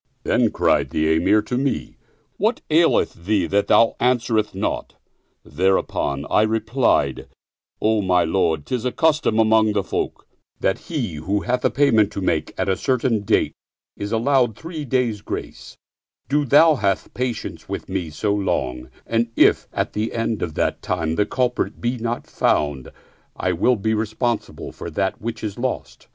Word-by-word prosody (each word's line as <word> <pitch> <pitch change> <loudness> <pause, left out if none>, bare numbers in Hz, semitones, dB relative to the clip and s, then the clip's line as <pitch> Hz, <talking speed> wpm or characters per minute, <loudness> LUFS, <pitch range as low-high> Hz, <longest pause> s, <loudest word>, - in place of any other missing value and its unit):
Then - - +2
cried - - +1
the 80 +1 +1
Emir 95 +6 +3
to 125 +3 -2
me, 135 0 -2 0.4
"What - - 0
aileth - - +3
thee 100 -3 +2
that 100 +4 +1
thou 115 - +4
answerest 115 -4 +1
not?" 95 - -3 0.5
Thereupon 75 -5 0
I - - +3
replied, 110 +4 +1 0.5
"O 110 0 +2
my 90 -2 +3
lord, 80 -3 0
*tis 125 -3 -2
a 125 - 0
custom 155 -8 +2
among 110 -1 +4
the 100 -2 0
folk - - -3 0.3
that* 95 - 0
he 120 - -3
who 95 +7 -1
hath 125 +2 -1
a - - +4
payment 115 -8 +3
to 100 - -4
make 80 -4 0
at - - -1
a 95 - +2
certain 125 -2 0
date 100 - +1 0.4
is 100 +1 -5
allowed 120 0 +2
three 160 -2 -6
days' 120 -5 0
grace: - - -7 0.5
do 145 +1 +1
thou 155 +4 +6
have 100 -4 -1
pa 125 - -1
tience 115 - -8
with - - -5
me 95 -4 -3
so 100 +7 -1
long, 65 -11 -2 0.2
and 115 0 0
if, - - +4
at - - -2
the 110 +2 -2
end 115 -1 -2
of 80 -3 -3
that - - -1
time, 80 -3 -1
the 105 +4 +1
culprit 125 0 -1
be 120 +1 -1
not 120 +1 -3
found, 70 -3 0 0.5
I 90 - -1
will 110 +9 +2
be 110 +1 -1
responsible 110 +2 -2
for - - -7
that 95 +4 -2
which 110 0 -5
is 105 +1 -4
lost." 130 +1 -4
110 Hz, 170 wpm, -22 LUFS, 95-125 Hz, 0.5 s, thou